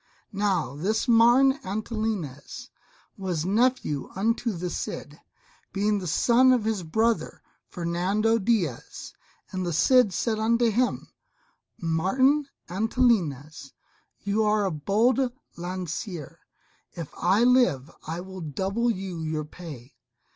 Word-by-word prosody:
Now 195 -9 0
this 210 - -1
Martin 245 +4 +5
Antolinez 215 - -4 0.5
was 180 -4 -2
nephew 210 - +1
unto 230 +4 0
the 180 -2 -4
Cid, - - -6 0.5
being 205 +1 +1
the 185 - -5
son 245 +10 +4
of 250 -4 +2
his 220 -3 -1
brother, 220 +8 -1 0.2
Ferrando 190 +6 0
Diaz. 190 - -2 0.4
And 185 -1 -3
the 175 - -2
Cid 250 - +4
said 220 +4 -1
unto 230 +1 +2
him, 245 +4 0 0.7
"Martin 255 - +2 0.2
Antolinez, 175 - 0 0.5
you 205 +2 +1
are 210 -1 +2
a 190 - 0
bold 205 - +1 0.4
lancier; 175 - -5 0.5
if 165 -4 -7
I 190 +6 +2
live 185 - +3 0.2
I 165 +2 -4
will 190 0 -9
double 190 - -1
you 190 -5 -3
your 155 -1 -3
pay. 150 -6 -11
195 Hz, 115 wpm, -26 LUFS, 170-230 Hz, 0.7 s, Martin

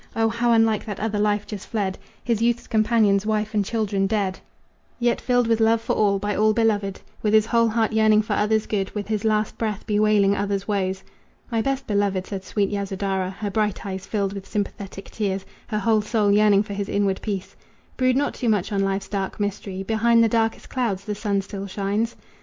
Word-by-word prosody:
O 225 0 +2
how 235 +1 +1
unlike 225 -2 +3
that 205 -3 -5
other 210 -1 -1
life 210 0 +1
just 205 -3 -7
fled! 200 -4 -1 0.3
His 230 -2 0
youth's 235 0 +1
companions, 215 -3 +3
wife 215 0 -1
and 210 -1 +2
children, 200 -2 0
dead, 195 -3 -1 0.6
Yet 240 -1 +1
filled 245 -1 +2
with 225 0 +2
love 225 0 +4
for 230 - -2
all, 200 -2 +2
by 205 +1 -2
all 215 +1 +3
beloved, 210 -3 +1 0.2
With 215 0 +2
his 215 -1 +5
whole 230 0 +3
heart 225 0 +1
yearning 215 -1 +4
for 210 - -2
others' 215 +1 +1
good, 195 -3 -1
With 205 -2 -3
his 215 -2 -1
last 215 -1 0
breath 215 -3 -2
bewailing 210 -2 +3
others' 200 -1 -2
woes." 190 -2 -1 0.5
"My 225 -1 +1
best 270 +3 -1
beloved," 200 -4 0
said 195 -2 -5
sweet 200 +1 -1
Yasodhara, 195 -2 -2
Her 200 +2 -5
bright 210 -1 -1
eyes 190 -1 -5
filled 200 -2 -1
with 195 -1 -7
sympathetic 200 -2 -5
tears, 195 -3 -2 0.2
Her 215 - -2
whole 215 +1 +2
soul 210 -1 +1
yearning 205 -1 +5
for 205 - -7
his 200 0 -3
inward 200 -2 0
peace, 200 -3 -4 0.4
"Brood 255 -1 +2
not 285 +1 0
too 240 - -1
much 205 -1 +1
on 200 -1 +1
life's 195 0 -1
dark 195 -1 -3
mystery 200 -2 -3
Behind 230 +2 +3
the - - +5
darkest 225 0 0
clouds 215 -7 -2
the 210 - -2
sun 200 -1 -1
still 200 0 -6
shines." 205 +4 -1
210 Hz, 205 wpm, -23 LUFS, 200-225 Hz, 0.6 s, his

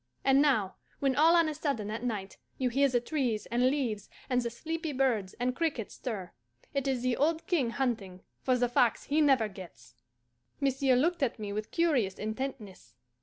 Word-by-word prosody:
And 270 +1 +5
now, 220 -10 +2 0.2
when 270 -2 +1
all 320 +4 +6
on 335 -2 +4
a 310 - -1
sudden 275 -9 -2
at 220 +1 -4
night 210 -5 -4 0.2
you 255 -1 +1
hear 275 +3 +3
the 245 -1 +2
trees 245 -5 -1
and 245 +2 +3
leaves 240 -8 -2 0.2
and 250 0 +3
the 235 - -2
sleepy 320 +6 -4
birds 240 -8 0
and 250 +1 -1
crickets 285 -9 -2
stir, 200 -8 -5 0.4
it 275 -1 -1
is 260 -2 0
the 255 -1 +1
old 320 +5 +1
King 290 -10 +1
hunting 220 -8 -2 0.2
for 255 -1 +2
the 245 0 +2
fox 240 -1 +2
he 300 +2 +1
never 265 -7 +4
gets." 190 -10 -12 0.7
Monsieur 270 -1 +2
looked 335 +7 +1
at 270 - 0
me 205 -2 -5
with 215 +1 -4
curious 275 - +1
intentness. 215 - -6
250 Hz, 185 wpm, -30 LUFS, 215-280 Hz, 0.7 s, all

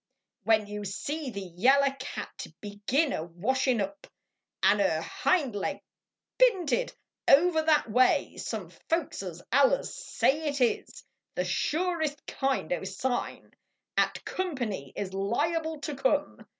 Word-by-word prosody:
When 220 -1 +4
you 210 0 -6
see 280 +9 -3
the 200 -4 -5
yaller 265 +10 +3
cat - - -6
begin 215 +9 0
a 155 - -2
washin 235 +9 0
up, 245 +10 -5 0.6
An 200 +2 +5
er 160 -5 +2
hind 345 - 0
leg 200 - -2 0.6
pinted 485 - +3 0.4
over 320 +3 +6
that 310 -4 +3
way, 250 +3 +3
some - - -5 0.2
Folkses 195 - -2
allers 280 - +3
say 315 - 0
it 285 0 -3
is 245 -3 0 0.3
The - - 0
surest 315 -3 -1
kind 270 - -1
o 180 - -3
sign 220 +7 -3 0.4
At - - +1
company 245 - -3
is 190 -2 -4
liable 315 +11 -1
to 295 0 -4
come. 285 +3 0
265 Hz, 125 wpm, -29 LUFS, 205-315 Hz, 0.6 s, over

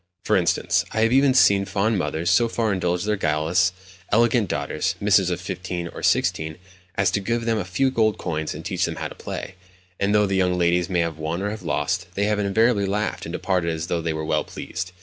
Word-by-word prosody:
For - - +3
instance, - - +2
I 110 - 0
have 115 +1 +3 0.2
seen 100 - +6
even 100 - -3
fond 105 +1 0
mothers 80 +2 -1
so 115 +6 +4
far 115 -2 0
indulge 90 -1 -1
their 105 0 0
guileless, 80 +2 +1 0.4
elegant 115 -2 +3
daughters—misses 100 -2 +1
of 90 -1 -2
fifteen 90 -1 -5
or - - -9
sixteen—as 90 +3 -1
to 100 - 0
give 115 +3 -2
them 115 -1 +1
a - - -1
few 130 +10 0
gold 110 -4 +2
coins 80 -3 -3
and - - -9
teach - - 0
them - - -4
how - - -4
to - - -10
play; - - -6 0.5
and 100 +1 +2
though 105 0 +4
the 95 - -2
young 90 -1 +2
ladies 85 0 +2
may 90 -2 +1
have 80 -2 -3
won 80 +4 -3
or 105 - -1
have 110 - -6
lost, 85 +2 -1
they 100 - 0
have 105 0 +1
invariably 105 +1 +2
laughed, 105 +2 -2
and - - -7
departed 90 -3 0
as 80 -1 -3
though 85 -1 -1
they 80 0 -1
were 80 0 -3
well - - +1
pleased. 90 -1 -6
95 Hz, 220 wpm, -23 LUFS, 85-105 Hz, 0.5 s, seen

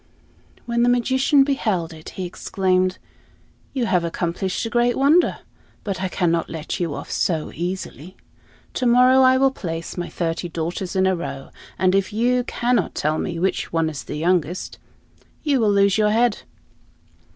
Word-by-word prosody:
When 235 0 0
the 240 - +4
magician 260 +3 +3
beheld 210 - -1
it, 155 -1 -10
he 185 - -3
exclaimed, 185 +1 0 0.7
"You 255 -3 -1
have 180 -6 +1
accomplished 175 +4 -2
a - - -3
great 240 0 +2
wonder, 300 +6 +3 0.4
but 195 -3 -3
I 190 - 0
cannot 170 -3 0
let 160 -1 -5
you 165 -5 -2
off - - -7
so 160 -4 -1
easily. 180 0 -5 0.6
To 255 - 0
morrow 250 +2 +6
I 260 0 +5
will 270 0 +3
place 165 -9 -6
my 175 0 -3
thirty 170 0 -3
daughters 170 +3 -4
in 190 0 +3
a 190 0 +2
row, 135 -6 -6 0.3
and 185 +1 +2
if 195 -1 +1
you 245 +3 +1
cannot 245 0 0
tell 155 +1 0
me 170 -2 -3
which 190 +3 -1
one 165 -1 0
is 140 -6 -7
the 150 - -6
youngest, 175 +1 -1 0.6
you 290 -4 +2
will 215 -3 +3
lose 200 +1 +3
your 210 -1 +3
head." 225 +1 +2
190 Hz, 165 wpm, -22 LUFS, 170-240 Hz, 0.7 s, morrow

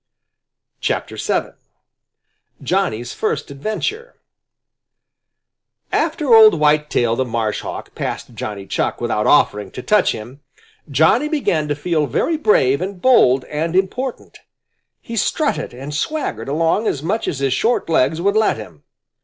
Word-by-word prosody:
VII. - - -1 1.1
JOHNNY'S 120 +2 -1
FIRST - - -2
ADVENTURE 220 - -4 1.8
After 310 -5 +1
old 220 -4 +8
Whitetail 150 -6 +2
the 130 - 0
Marshhawk 115 -3 -4
passed - - -5
Johnny 100 -2 -6
Chuck - - -2
without - - -1
offering 105 -1 +3
to 125 - -8
touch 210 -3 +3
him, 120 +6 -10 0.5
Johnny 160 - +3
began 175 - 0
to 145 - -1
feel 155 0 -1
very 330 - 0
brave 150 - +2
and 190 0 -4
bold 135 - +4
and 160 +3 -3
important. 240 +7 -2 0.6
He 230 - -7
strutted 295 +8 -1
and 135 +4 -8
swaggered 145 - -3
along 165 +8 +1
as 140 - -2
much 210 +7 -1
as 145 - -2
his 135 -1 0
short 235 - 0
legs 160 -1 +2
would 200 +4 +1
let 220 - +2
him. 90 -9 -11
155 Hz, 130 wpm, -19 LUFS, -, 1.8 s, old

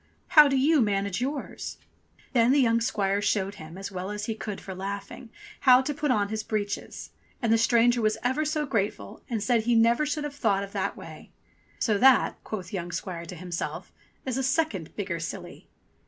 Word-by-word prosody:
How 300 -4 +8
do 275 -1 +1
you 290 +2 +4
manage 200 -1 0
yours 275 +2 -4 0.3
?" - - -31
Then 245 +2 +4
young 230 -4 +3
squire 200 -3 0
showed 200 -1 0
him, 155 +3 -10
as 195 +1 -6
well 185 0 -5
as 210 0 -4
he 225 - -2
could 210 -2 -6
for 190 - -8
laughing, 200 +5 -6 0.3
how 255 -1 +6
to 295 - -2
put 295 +1 -2
on 205 -5 +2
his 215 0 -2
breeches, 205 -1 -4 0.3
and 230 -2 +2
the - - +5
stranger 235 +1 +4
was 215 0 +1
ever 260 +5 +1
so 305 0 -1
grateful 215 -5 -3
and 225 -4 -2
said 230 -1 +2
he 240 0 +3
never 230 +5 +4
should 300 0 -2
have 295 -1 -4
thought 200 -8 +1
of 200 - -8
that - - -2
way. - - -11 0.5
"So 210 -3 +1
that," 265 0 +4
quoth 190 -4 -6
young 175 -2 -4
squire 170 -3 -5
to 180 - -7
himself, 175 0 -5 0.3
"is 260 -1 -2
a - - -1
second 260 - -1
bigger 185 -5 -3
silly." 165 - -7
220 Hz, 200 wpm, -27 LUFS, 200-255 Hz, 0.5 s, How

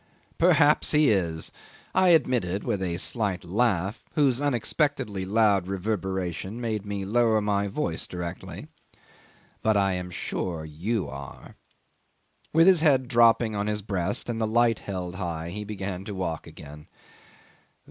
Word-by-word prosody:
"Perhaps 160 -4 +4
he 150 -4 +5
is," 85 -5 -1 0.4
I 185 0 +4
admitted 120 - +2
with 100 - -1
a 85 -2 -2
slight 100 -1 0
laugh, 100 0 0
whose 140 -4 +2
unexpectedly 135 -5 0
loud 100 -2 +2
reverberation 95 0 -3
made 110 -4 -3
me 100 -1 -3
lower 115 +1 +3
my 100 -1 0
voice 95 - -2
directly; 90 0 -6 1.0
"but 110 -1 +2
I 95 -1 +2
am 90 0 -4
sure 85 0 -4
you 90 +7 -2
are." 70 0 -10 1.0
With 165 +1 +5
his 185 -2 +6
head 135 -5 +3
dropping 115 -2 +4
on 100 0 -1
his 105 -1 -2
breast 95 -2 -2
and 115 -1 -3
the 110 - +1
light 115 0 +2
held 90 -2 -5
high 85 -3 -4
he 105 +3 -5
began 100 -3 -5
to 105 - -6
walk 85 -4 -3
again. 75 +1 -12
100 Hz, 140 wpm, -26 LUFS, 90-120 Hz, 1.0 s, his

